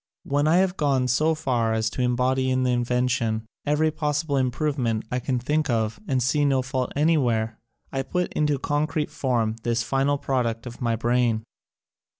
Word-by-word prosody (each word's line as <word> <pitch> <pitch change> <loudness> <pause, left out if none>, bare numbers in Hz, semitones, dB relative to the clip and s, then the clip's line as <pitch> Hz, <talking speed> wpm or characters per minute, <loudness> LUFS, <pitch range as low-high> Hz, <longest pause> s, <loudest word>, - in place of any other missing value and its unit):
When 145 +2 +1
I 160 - +4
have 185 0 +2
gone 135 -4 +1
so 155 +6 +2
far 120 -7 0
as 110 0 0
to 125 - -3
em 125 0 +2
body 130 +1 +1
in 130 0 +1
the 125 - +2
invention 120 -2 0 0.2
every 155 +2 +2
possible 150 -1 -1
im 130 -2 +2
provement 125 -5 -1
I 125 - 0
can 125 +1 -1
think 150 +4 0
of 110 -2 0
and 130 -3 +1
see 145 +4 +2
no 135 -2 +2
fault 130 -1 -2
anywhere, 130 -8 +1 0.3
I 135 - -1
put 180 +7 -2
into 150 -2 +1
concrete 150 +2 -1
form 115 -4 0
this 115 0 0
final 135 +4 +1
product 120 -4 -1
of 120 +2 -9
my 115 -1 +1
brain. 120 -1 +1
130 Hz, 180 wpm, -25 LUFS, 120-145 Hz, 0.3 s, I